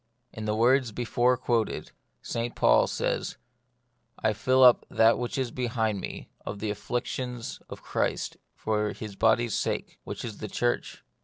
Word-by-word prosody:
In 110 - -6
the 105 0 0
words 125 +2 +3
before 120 +2 +2
quoted, 120 -3 -1 0.3
St 115 +1 -3
Paul - - +5
says, - - -2 0.4
" 120 -1 -46
I 110 - +3
fill 130 +5 +3
up 125 -1 +7
that 115 +1 +4
which 120 +1 -3
is 130 -3 -1
behind 110 -5 -2 0.2
of 105 - -5
the 105 +1 -2
afflictions 120 +2 -4
of - - -9
Christ - - -1 0.2
for 105 -1 -1
his 105 -2 -8
body's 115 +1 +3
sake, - - -2
which - - -6
is 110 -3 -7
the 110 - -4
church." 120 +4 -1
115 Hz, 155 wpm, -28 LUFS, 110-125 Hz, 0.4 s, up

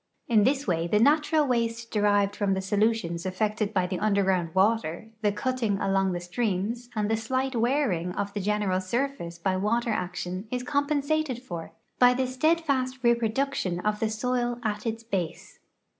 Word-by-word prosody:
In 215 -3 +4
this 275 +1 +1
way 170 -3 0
the 210 - +2
natural 300 +5 +4
waste 230 -2 -1
derived 205 -1 +2
from 200 -2 +1
the 190 - -2
solutions 200 -4 0
effected 210 +3 -1
by 185 -4 +1
the 180 0 -3
underground 190 -5 +1
water, 215 0 +1
the 210 -1 +2
cutting 225 -1 -1
along 195 -1 +1
the 175 - -2
streams, 210 +5 -2
and 210 -1 0
the 225 - +2
slight 260 +4 -1
wearing 230 - +1
of 200 +1 -3
the 205 - -2
general 200 -2 0
surface 210 -4 -2
by 185 +2 0
water 230 +4 0
action 185 0 -3
is 250 +1 -2
compen 285 +1 0
sated 285 -4 -1
for 170 -9 -7 0.3
by 250 0 +6
the 260 +1 +1
steadfast 265 -1 +1
reproduction 235 -4 +1
of 210 +1 -1
the 220 - 0
soil 240 +2 -1
at 210 0 -2
its 225 0 -3
base. 190 -7 -4
220 Hz, 170 wpm, -27 LUFS, 190-250 Hz, 0.3 s, by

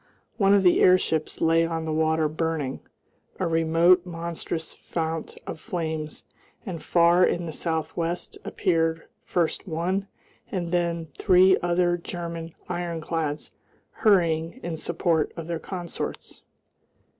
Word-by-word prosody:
One 200 -1 +5
of 200 - +4
the 180 - +5
airships 180 -4 +3
lay 165 0 +4
on 165 -1 -2
the 160 - -2
water 160 0 +2
burning, 155 -3 -2 0.6
a 185 - +1
remote 165 +2 +4
monstrous 170 -1 -4
fount 160 -1 -4
of - - -6
flames, 160 -6 -4 0.4
and 175 -6 -5
far 170 +1 +4
in 175 -1 +1
the 160 - -4
south 160 0 -2
west 170 +1 -3
appeared 165 -2 0 0.2
first 175 +3 -1
one 185 +4 -1 0.4
and 175 -3 -2
then 170 -2 0
three 185 +1 +6
other 175 0 +2
German 170 -1 -6
ironclads 165 -3 -3 0.4
hurrying 170 -2 +2
in 170 -2 -3
support 165 -1 0
of 165 - -5
their 170 0 -3
consorts.... 175 -1 -6
170 Hz, 125 wpm, -26 LUFS, 160-175 Hz, 0.6 s, three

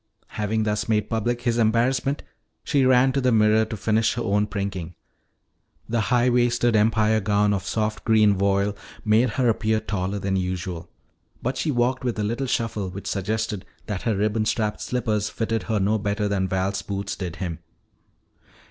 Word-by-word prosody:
Having 110 +1 -1
thus 105 +1 -1
made 105 -1 +1
public 120 +2 -1
his 120 -1 +1
embarrassment, 125 +5 +1 0.4
she 140 -4 +2
ran 130 +1 +5
to 135 +1 0
the 125 -1 +2
mirror 110 0 +4
to 110 0 -6
finish 110 +3 +1
her 120 - -2
own 105 0 +1
prinking. 95 -4 -4 0.9
The 115 0 0
high 120 0 +3
waisted 120 -1 +2
Empire 110 0 +3
gown 105 0 +2
of 100 -1 -3
soft 110 -1 -1
green 110 -2 +4
voile 100 +1 +1 0.3
made 110 +4 +4
her 130 -2 +3
appear 110 -1 +1
taller 100 -2 -3
than 95 -1 -1
usual. 90 -2 -4 0.5
But 130 +2 -1
she 155 - -1
walked 125 -1 +1
with 120 -3 -1
a 105 - -1
little 120 +6 -2
shuffle 110 -5 -1
which 95 +2 -8
suggested 105 +1 -2 0.2
that 105 -4 -4
her 115 -3 0
ribbon 105 +2 0
strapped 105 -2 -1
slippers 110 -4 -1
fitted 115 -1 -2
her 110 -2 +1
no 105 +3 +1
better 105 +1 -1
than 100 -2 0
Val's 95 +1 -1
boots 100 0 -4
did 90 -3 -5
him. 90 -3 -4
110 Hz, 175 wpm, -24 LUFS, 100-115 Hz, 0.9 s, ran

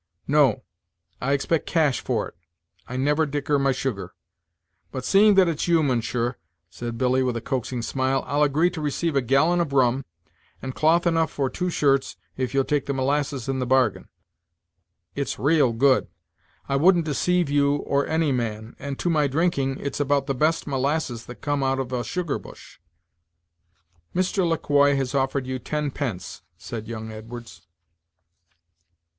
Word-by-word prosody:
"No, 140 -6 +3 0.6
I 135 +3 +1
expect 145 +3 0
cash 155 -6 +2
for - - -1
it; - - -16 0.5
I 125 - -5
never 150 +4 +2
dicker 145 0 0
my 135 0 +2
sugar, 125 -6 -4 0.8
But, 130 - -5
seeing 205 +1 +5
that 190 -2 +5
it's 165 -1 -1
you, 165 -2 +4
mounsher," 120 -2 -1 0.3
said 120 +4 -6
Billy, 130 +1 +2
with 125 -2 0
a - - -2
Coaxing 125 0 -3
smile, 130 +2 0
"I'll 145 +1 0
agree 150 +5 +3
to 170 -3 -6
receive 150 +2 -1
a 135 - +3
gallon 140 +8 +3
of 150 -5 -3
rum, 130 0 +3 0.6
and 130 0 -6
cloth 165 +5 +3
enough 165 -2 +2
for 135 -2 -2
two 180 +6 -2
shirts 135 -5 +1 0.2
if 130 -2 -2
you'll 135 0 +2
take 145 +1 -1
the 140 - -1
molasses 135 -1 -1
in 135 -1 -1
the 125 - -2
bargain. 125 -8 +1 1.0
It's - - -3
raal 140 +1 +3
good. 130 +3 +3 0.6
I 140 - +1
wouldn't 170 +2 +4
deceive 175 +3 +1
you 145 0 +3
or 140 -1 0
any 160 -2 +1
man 110 -3 -3
and 140 -1 -5
to - - -3
my 155 -4 +3
drinking 140 -3 0
it's 140 0 -4
about 145 -1 +1
the 135 - -1
best 155 +5 +1
molasses 135 -3 -2
that 125 -3 -10
come 145 -1 -1
out 135 0 +1
of 130 -1 -4
a 120 -1 -1
sugar 170 +5 -2
bush." - - -14 1.4
"Mr. 185 0 +1
Le 165 - +1
Quoi 145 -1 +3
has 135 -1 -2
offered 135 -1 0
you 130 0 -3
ten 150 +1 -2
pence," 120 -10 -5 0.2
said 110 -2 -7
young 110 -1 -6
Edwards. 115 -4 -10
140 Hz, 170 wpm, -24 LUFS, 130-150 Hz, 1.4 s, seeing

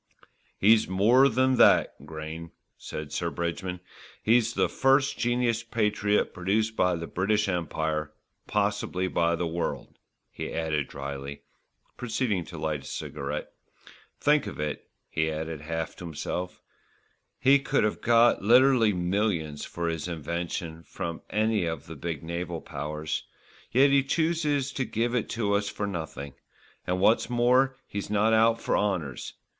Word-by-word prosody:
"He's 110 +2 +5
more 115 +9 +5
than 130 +2 +2
that, - - +5
Grayne," 80 +1 -7 0.3
said 75 -1 -7
Sir 85 +1 -1
Bridgman, 90 +2 -3 0.4
"he's 120 +1 +3
the - - +3
first 135 +1 +3
genus 120 -1 +1
patriot 105 -2 0
produced 105 +4 0
by 90 -3 +2
the 85 0 -4
British 105 +5 0
Empire, 80 -4 -2 0.4
possibly 100 -3 0
by 85 -1 +1
the 85 - -2
world," 85 +1 -4 0.3
he - - -5
added 80 -3 -1
drily, 70 0 -6 0.5
proceeding 115 -5 -1
to - - -9
light 75 -2 -2
a - - -14
cigarette. 75 0 -5 0.7
"Think 150 -1 +3
of - - -7
it," 75 -1 -4 0.2
he 80 0 0
added 80 -1 -4
half 80 +1 -4
to 90 - -8
himself, 90 +3 -5 0.8
"he 140 +1 +5
could 135 - +1
have 105 - -1
got 120 0 +4
literally 120 0 +5
millions 90 -4 -1
for 85 0 -4
his 80 0 -2
invention 85 0 -4
from 85 0 -6
any 110 -3 +1
of 80 -3 -4
the 80 - -9
big 80 0 -5
naval 85 0 -4
powers; 75 0 -4 0.5
yet 135 +3 +5
he 140 0 +5
chooses 150 -2 0
to 135 - -2
give 120 0 -1
it 125 -3 0
to 105 -3 0
us 100 0 +1
for 105 - -3
nothing, 80 -7 -5 0.5
and 90 0 0
what's 110 +5 +3
more 125 +2 +3
he's 100 -1 -5
not 105 +2 +3
out 115 +1 +4
for - - 0
honours. 90 -11 -2
95 Hz, 145 wpm, -27 LUFS, 80-115 Hz, 0.8 s, He's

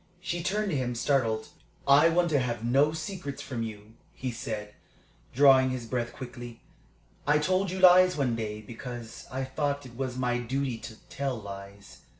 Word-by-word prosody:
She 175 -1 -3
turned 205 +3 0
to - - 0
him, 125 -2 -1
startled. 115 -4 +1 0.4
"I 145 +4 +7
want 175 0 +2
to 145 - +4
have 120 -2 -2
no 135 +6 +4
secrets 160 -2 -5
from 120 -4 -4
you," 110 -1 -7 0.2
he 130 -1 -3
said, 110 -3 -5 0.6
drawing 135 -1 +6
his 130 -2 -3
breath 120 0 -2
quickly. 120 -2 -9 0.7
"I 150 +1 +5
told 185 +5 +1
you 185 - -4
lies 185 -1 +7
one 130 -5 +1
day, 105 -2 -4
because 120 +1 -8
I 130 +1 -2
thought 140 +1 -2
it 120 -2 -12
was 130 -1 -3
my 125 -1 0
duty 125 0 -2
to 110 - -9 0.2
tell 135 -3 -2
lies. 100 0 -10
130 Hz, 170 wpm, -28 LUFS, 115-150 Hz, 0.7 s, I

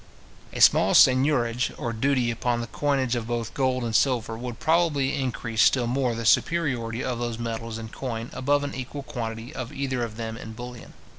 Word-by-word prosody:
A - - -5
small - - +6
seignorage 130 -2 +4
or 115 - -3
duty 125 0 +1
upon 120 +1 -1
the 120 - -3
coinage 135 -1 0
of 115 -2 -3
both 115 -1 -3
gold 130 -2 0
and 115 -2 -2
silver, 115 -4 +2
would 120 0 -6
probably 155 -4 +2
increase 120 -4 -1
still 125 -3 +4
more 125 0 0
the 115 0 -4
superiority 125 -5 +1
of 125 -2 -2
those 120 -1 -3
metals 115 -1 -4
in 110 -1 -7
coin 115 -1 -5
above 145 +2 +1
an 145 - -4
equal 135 +2 -6
quantity 115 +1 -5
of 130 -2 -5
either 135 -3 -2
of 110 -2 -5
them 115 -1 -5
in 110 -1 -8
bullion. 120 +1 -9
120 Hz, 190 wpm, -25 LUFS, 115-135 Hz, -, small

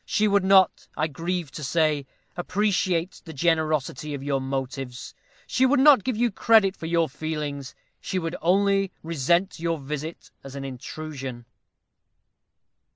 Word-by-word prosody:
She 215 - +1
would 200 -1 +3
not, 190 -2 +4
I 155 - +2
grieve 165 +1 -3
to 150 - -7
say, 150 -1 +1 0.3
appreciate 185 -1 0
the 160 - -8
generosity 155 -2 0
of 135 - -7
your 140 -1 0
motives. 135 -1 -5 0.3
She 255 - 0
would 260 +1 +4
not 270 -6 +7
give 255 -4 -1
you 240 0 +2
credit 205 -1 +4
for 160 - -7
your 165 -1 +2
feelings. 145 -1 -5 0.2
She 190 - -3
would 165 -1 -2
only 195 +2 +2
resent 170 +4 +1
your 165 0 -1
visit 150 +3 -6
as 135 0 -10
an 135 0 -5
intrusion." 135 -1 -7
160 Hz, 145 wpm, -25 LUFS, 140-190 Hz, 0.3 s, not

